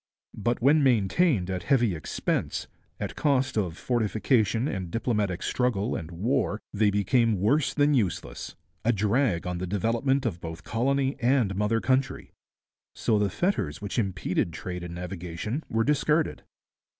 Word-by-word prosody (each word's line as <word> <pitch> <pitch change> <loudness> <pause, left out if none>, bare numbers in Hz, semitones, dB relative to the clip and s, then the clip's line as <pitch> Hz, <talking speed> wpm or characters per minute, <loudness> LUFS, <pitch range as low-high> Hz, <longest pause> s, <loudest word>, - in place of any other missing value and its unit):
But 120 +2 -1
when 150 +3 +5
maintained 115 - +2
at 90 -1 -2
heavy 120 -6 +2
expense, 80 - -2 0.3
at - - -4
cost 135 -3 +1
of 90 -6 -1
fortification 115 0 +1
and 95 - -3
diplomatic 105 -3 -1
struggle 120 -3 0
and 80 - -5
war, 105 +5 0
they 105 0 +3
became 105 +1 +2
worse 130 +9 +2
than 145 0 +3
useless, 95 - -2 0.3
a 120 - +3
drag 105 -2 +1
on 90 -1 -3
the 95 - -3
development 115 +8 0
of 90 -7 -2
both 80 -1 -7
colony 135 +4 0
and 120 -5 +2
mother 105 +3 +1
country. 130 +2 0 0.6
So 110 -2 +1
the 105 -1 +2
fetters 100 - -1
which 100 +3 -3
impeded 95 -4 -1
trade 90 +1 -5
and 85 -1 -6
navigation 90 - -4
were 115 0 +1
discarded. 150 +3 +1
110 Hz, 145 wpm, -27 LUFS, 95-130 Hz, 0.6 s, when